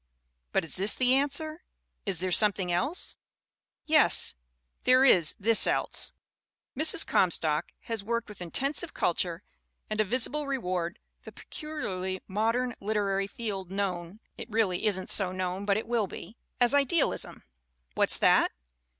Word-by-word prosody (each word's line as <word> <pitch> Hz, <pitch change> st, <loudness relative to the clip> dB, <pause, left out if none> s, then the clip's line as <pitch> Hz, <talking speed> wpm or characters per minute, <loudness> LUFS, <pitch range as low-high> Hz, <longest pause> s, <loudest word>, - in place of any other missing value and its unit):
But -, -, 0 dB
is 155 Hz, -, -3 dB
this 195 Hz, +3 st, +5 dB
the 255 Hz, 0 st, +2 dB
answer? 310 Hz, +4 st, -1 dB, 0.5 s
Is 185 Hz, -4 st, +1 dB
there 185 Hz, 0 st, -2 dB
something 195 Hz, -2 st, +3 dB
else? 185 Hz, -, -2 dB, 0.7 s
Yes, 310 Hz, -1 st, +3 dB, 0.5 s
there 255 Hz, +1 st, +4 dB
is 170 Hz, -, +4 dB
this 225 Hz, +2 st, +6 dB
else. -, -, -1 dB, 0.6 s
Mrs. 315 Hz, +1 st, +5 dB
Comstock 160 Hz, -3 st, +2 dB
has 225 Hz, -3 st, -5 dB
worked 235 Hz, +2 st, -3 dB
with 210 Hz, -3 st, -13 dB
intensive 275 Hz, -, -2 dB
culture 175 Hz, +1 st, -1 dB, 0.5 s
and 215 Hz, 0 st, 0 dB
a -, -, +3 dB
visible 255 Hz, +7 st, 0 dB
reward 185 Hz, -10 st, -3 dB, 0.2 s
the -, -, -12 dB
pecu 305 Hz, -, -10 dB, 0.2 s
liarly 185 Hz, 0 st, -4 dB
modern 230 Hz, +5 st, -1 dB
literary 200 Hz, -2 st, -1 dB
field 200 Hz, -4 st, -6 dB
known 190 Hz, 0 st, -4 dB, 0.2 s
(it -, -, -8 dB
really 215 Hz, -2 st, 0 dB
isn't 190 Hz, -2 st, 0 dB
so 190 Hz, -3 st, +4 dB
known 185 Hz, +1 st, -4 dB
but 200 Hz, 0 st, +1 dB
it 220 Hz, -, -4 dB
will 230 Hz, -3 st, -1 dB
be) 185 Hz, +4 st, -11 dB, 0.2 s
as 245 Hz, +1 st, +3 dB
idealism. 285 Hz, +3 st, 0 dB, 0.5 s
What's -, -, +4 dB
that? -, -, +3 dB
205 Hz, 140 wpm, -28 LUFS, 185-250 Hz, 0.7 s, this